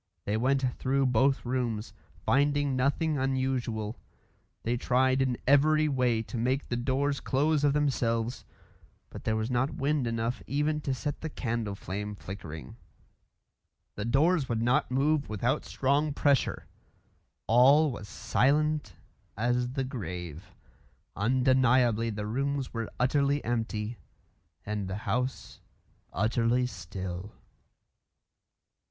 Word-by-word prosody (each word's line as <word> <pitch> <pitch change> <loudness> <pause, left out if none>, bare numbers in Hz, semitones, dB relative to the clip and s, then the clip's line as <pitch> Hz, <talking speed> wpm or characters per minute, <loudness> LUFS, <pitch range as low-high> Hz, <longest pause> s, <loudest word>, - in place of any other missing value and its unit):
They 105 - 0
went 130 +4 +1 0.2
through 135 +1 +1
both 130 +2 +2
rooms, 120 -4 -2 0.3
finding 145 0 +2
nothing 140 +3 +1
unusual. 130 -5 -1 0.6
They 120 +2 0
tried 130 +2 +2
in 130 -2 +1
every 155 +3 +4
way 125 -5 +1
to 115 - -5
make 130 +4 0
the 120 - 0
doors 135 +3 0
close 145 +2 +1
of 145 -1 +4
themselves, 125 -5 0 0.7
but - - -9
there 110 - +1
was 110 +3 -2
not 125 +3 0
wind 140 -2 0
enough 115 -1 -2
even 150 +4 0
to 135 -2 -1
set 145 +2 -4
the 160 - -3
candle 115 -7 -3
flame 105 +2 -5
flickering. 80 -9 -8 1.2
The 100 - -4
doors 145 +5 +2
would 115 -1 0
not 120 +2 +2
move 140 +3 +1
without 120 +7 -1
strong 140 +2 0
pressure. 140 -3 +1 0.8
All 135 +6 +5
was 105 -4 -7
silent 145 - +1 0.4
as 120 +2 0
the 135 -1 -1
grave. 90 - -6 0.6
Undeniably 125 0 +3
the 105 -1 -4
rooms 135 +4 -2
were 115 -2 -3
utterly 140 +2 +2
empty, 115 -1 -2 0.7
and 105 -2 -3
the 95 +1 -3
house 125 +6 -2 0.5
utterly 115 +5 +1
still. 95 -1 -6
125 Hz, 120 wpm, -29 LUFS, 110-140 Hz, 1.2 s, All